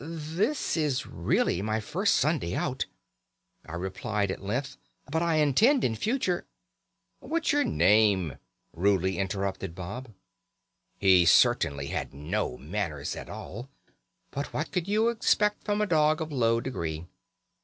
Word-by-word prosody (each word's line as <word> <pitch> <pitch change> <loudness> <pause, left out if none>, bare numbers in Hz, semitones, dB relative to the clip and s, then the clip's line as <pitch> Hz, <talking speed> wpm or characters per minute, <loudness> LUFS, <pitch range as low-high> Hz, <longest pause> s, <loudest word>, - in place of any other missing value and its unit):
'This 165 - -2
is 150 -5 0
really 85 - 0
my 110 +2 -1
first 105 - +1
Sunday - - +1
out,' - - -2 0.8
I 85 - -6
replied 95 +3 -2
at - - -6
length, 120 +8 -3 0.3
'but 160 +2 +1
I 170 -1 +1
intend 210 - +4
in 115 - +2
future 210 - -1 0.4
' 90 0 -51
"'What's 330 +1 -1
your 290 0 +3
name?' 100 - +3 0.4
rudely 95 0 +1
interrupted 95 -3 -3
Bob. 105 +8 -7 0.9
"He 95 -3 +5
certainly 70 -3 +4
had - - -4
no 75 -1 -2
manners 75 -2 -3
at - - -8
all, 120 +7 -8 0.6
but 140 +1 -4
what 155 - -3
could 180 -1 -1
you 215 +3 +3
expect 210 -2 +1
from 210 0 0
a - - +3
dog 155 -3 +3
of 160 -1 -4
low 115 -4 +2
degree? 85 -11 -4
110 Hz, 140 wpm, -28 LUFS, -, 0.9 s, He